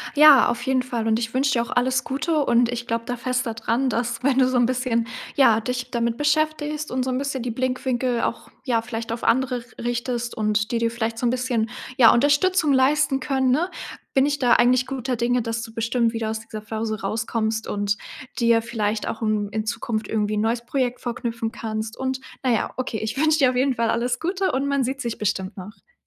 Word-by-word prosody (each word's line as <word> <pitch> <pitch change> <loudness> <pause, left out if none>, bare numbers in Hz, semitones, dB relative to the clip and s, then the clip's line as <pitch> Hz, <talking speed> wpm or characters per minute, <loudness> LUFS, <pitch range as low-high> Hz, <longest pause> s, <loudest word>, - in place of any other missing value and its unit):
Ja, 300 -2 +8
auf 240 0 -1
jeden 260 -1 +1
Fall 235 -3 -3
und 220 0 +3
ich 230 0 -3
wünsche 270 +1 +2
dir 235 - +2
auch 235 - -9
alles 255 +1 +1
Gute 305 +2 0
und 235 0 +3
ich 240 0 -4
glaube 230 0 -2
da 245 -1 -3
fest 250 0 -1
da 225 - -3
dran, 240 +3 0
dass, 235 +1 -2
wenn 270 -1 +2
du 255 -1 +5
so 255 -1 +1
'n 240 -1 +4
bisschen 250 -2 0 0.3
ja, 230 -6 +5
dich 250 +2 -4
damit 235 -1 -1
beschäftigst 300 0 0
und 255 0 0
so 260 - -2
'n 255 - 0
bisschen 275 -2 -2
die 245 - -3
Blickwinkel 255 0 -1
auch - - -3
ja, 230 -4 0
vielleicht 230 -1 -5
auf 230 - -4
andere 260 0 +2
r 235 - -8 0.2
richtest 240 0 -2
und 215 +1 0
die 235 - +1
dir 230 0 0
vielleicht 230 -1 -3
so 245 - -2
'n 235 - +3
bisschen, 250 -3 0 0.3
ja, 230 -3 +8
Unterstützung 290 +4 +3
leisten 270 +1 +3
können, 265 -2 +1
ne, 330 +8 +1 0.4
bin 270 +1 +4
ich 290 0 0
da 245 -2 +3
eigentlich 250 +1 +4
guter 260 -1 -3
Dinge, 240 +1 +1
dass 230 0 -3
du 225 -1 -9
bestimmt 230 +1 0
wieder 225 -1 -2
aus 220 - -3
dieser 215 -1 -8
Phase 220 0 -4
rauskommst 220 +1 -2
und 205 0 -1 0.4
dir 230 -2 +4
vielleicht 220 -2 -2
auch 225 - -4
n 210 -1 0
in 215 0 -2
Zukunft 220 -1 -3
irgendwie 215 -1 -1
'n - - +1
neues 230 +2 0
Projekt 250 0 -1
vorknöpfen 235 -2 -3
kannst 220 0 -5
und 260 0 -2 0.2
na 255 - +2
ja, 225 - 0
okay, 255 -4 -3
ich 220 +3 -4
wünsche 315 +1 +3
dir 265 -3 +5
auf 250 - -2
jeden 260 +1 +2
Fall 230 -1 0
alles 240 +1 0
Gute 375 +3 0
und 275 +2 -1
man 280 -2 +1
sieht 265 +2 -3
sich 235 -1 -3
bestimmt 190 -1 -2
noch. 210 - -12
240 Hz, 225 wpm, -23 LUFS, 225-260 Hz, 0.4 s, Ja